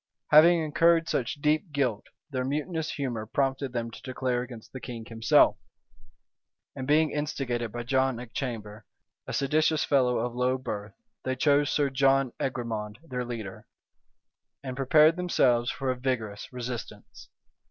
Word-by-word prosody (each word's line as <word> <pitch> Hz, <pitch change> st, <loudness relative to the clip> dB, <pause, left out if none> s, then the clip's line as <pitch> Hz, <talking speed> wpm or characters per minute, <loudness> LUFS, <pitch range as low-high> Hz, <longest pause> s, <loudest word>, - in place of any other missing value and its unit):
Having 165 Hz, +2 st, +7 dB
incurred 165 Hz, +2 st, +3 dB
such 120 Hz, -4 st, -1 dB
deep 155 Hz, +4 st, +1 dB
guilt, 130 Hz, -7 st, -1 dB, 0.2 s
their 130 Hz, -2 st, -1 dB
mutinous 155 Hz, +4 st, -2 dB
humor 120 Hz, -7 st, -3 dB
prompted 135 Hz, +2 st, -1 dB
them 115 Hz, -2 st, -3 dB
to -, -, -11 dB
declare 130 Hz, -1 st, -2 dB
against 120 Hz, -3 st, -10 dB
the 130 Hz, -, -6 dB
king 120 Hz, -2 st, -7 dB
himself; 115 Hz, 0 st, +4 dB, 1.2 s
and 130 Hz, -1 st, -5 dB
being 155 Hz, +1 st, +3 dB
instigated 125 Hz, -6 st, -2 dB
by 120 Hz, +1 st, -5 dB
John 130 Hz, 0 st, +1 dB
Achamber, 115 Hz, -3 st, -6 dB, 0.4 s
a -, -, -5 dB
seditious 155 Hz, +3 st, +2 dB
fellow 125 Hz, -4 st, +2 dB
of 120 Hz, +1 st, -2 dB
low 125 Hz, +1 st, +1 dB
birth, 110 Hz, -5 st, -6 dB, 0.3 s
they 130 Hz, 0 st, -1 dB
chose 145 Hz, +2 st, +3 dB
Sir 145 Hz, -2 st, +1 dB
John 135 Hz, -1 st, +3 dB
Egremond 115 Hz, -5 st, -3 dB
their 125 Hz, -6 st, -4 dB
leader, 115 Hz, -5 st, -7 dB, 1.0 s
and 130 Hz, -2 st, -5 dB
prepared 155 Hz, +5 st, +5 dB
themselves 125 Hz, -9 st, +2 dB
for 135 Hz, -2 st, -2 dB
a -, -, -2 dB
vigorous 125 Hz, -5 st, -3 dB
resistance. 125 Hz, -1 st, -7 dB
130 Hz, 140 wpm, -28 LUFS, 120-145 Hz, 1.2 s, Having